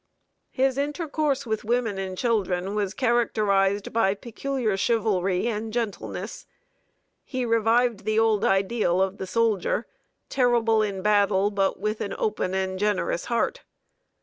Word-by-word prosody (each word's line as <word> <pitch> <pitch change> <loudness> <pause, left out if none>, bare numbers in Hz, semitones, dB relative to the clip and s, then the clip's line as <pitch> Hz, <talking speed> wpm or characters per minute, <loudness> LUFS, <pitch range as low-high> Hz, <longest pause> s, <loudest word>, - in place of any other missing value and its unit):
His 265 +1 +1
intercourse 290 -2 -1
with 220 -2 -2
women 225 -3 0
and 190 -1 -4
children 195 -5 0
was 205 -1 -2
characterized 205 -5 +1
by 205 -4 +2
peculiar 235 0 -2
chivalry 195 -4 +1
and 220 -1 -3
gentleness. 235 - -4 0.8
He 255 -2 -3
revived 230 0 +2
the 215 0 0
old 220 -2 +3
ideal 195 -1 +2
of 190 +1 0
the 190 - -4
soldier 225 +1 +1 0.4
terrible 235 -4 +2
in 195 -3 -2
battle, 205 -1 +3
but 195 -3 0
with 215 +2 -2
an 200 - -3
open 200 -3 -1
and 190 0 -2
generous 205 -4 0
heart. 240 - -1
215 Hz, 130 wpm, -25 LUFS, 195-235 Hz, 0.8 s, old